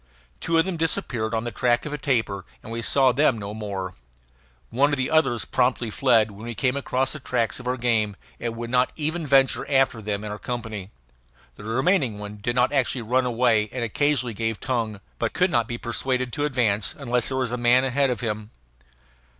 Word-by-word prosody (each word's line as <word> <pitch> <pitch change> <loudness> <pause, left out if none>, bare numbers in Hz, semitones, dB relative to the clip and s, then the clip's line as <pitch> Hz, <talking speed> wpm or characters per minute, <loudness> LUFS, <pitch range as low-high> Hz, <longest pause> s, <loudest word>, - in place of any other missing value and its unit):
Two 165 0 +1
of 165 - +4
them 190 -3 -3
disappeared 120 -8 0
on 110 - -1
the 120 - -4
track 120 +2 +1
of 150 - -5
a - - -2
tapir 110 -8 0 0.2
and 115 - -9
we 115 0 -3
saw 130 +2 +4
them 130 -1 +3
no 100 -1 -6
more; 100 -4 -5 0.8
one 135 +5 +3
of 145 - 0
the 130 +2 -1
others 135 -7 +2
promptly 125 -2 0
fled 115 -4 +3
when 105 +3 -10
we 120 - -5
came 130 +2 +1
across 135 -1 0
the 155 - -7
tracks 120 -4 -1
of 125 - -8
our 125 +1 0
game, 115 -4 +1 0.2
and 115 -1 -3
would 120 0 -5
not 125 0 +3
even 160 +1 -2
venture 135 -1 +4
after 135 -5 +2
them 105 -1 -3
in 105 - -5
our 105 - -6
company; 115 -5 -5 0.7
the - - -12
remaining 130 - +1
one 105 0 -7
did 120 +4 -2
not 125 0 +3
actually 130 -3 0
run 125 +3 +1
away 115 -3 +2
and 125 -2 -3
occasionally 125 +1 +1
gave 115 0 -2
tongue, 115 -5 -2 0.2
but - - -1
could 180 0 +2
not 120 -7 +2
be 120 - -4
persuaded 125 +2 -1
to 145 -1 0
advance 115 -7 +1
unless 125 -4 0
there 130 - -1
was 130 -3 -1
a - - 0
man 120 +1 +4
ahead 135 +1 +2
of 125 - -2
him. 105 -2 -3
120 Hz, 210 wpm, -24 LUFS, 110-130 Hz, 0.8 s, of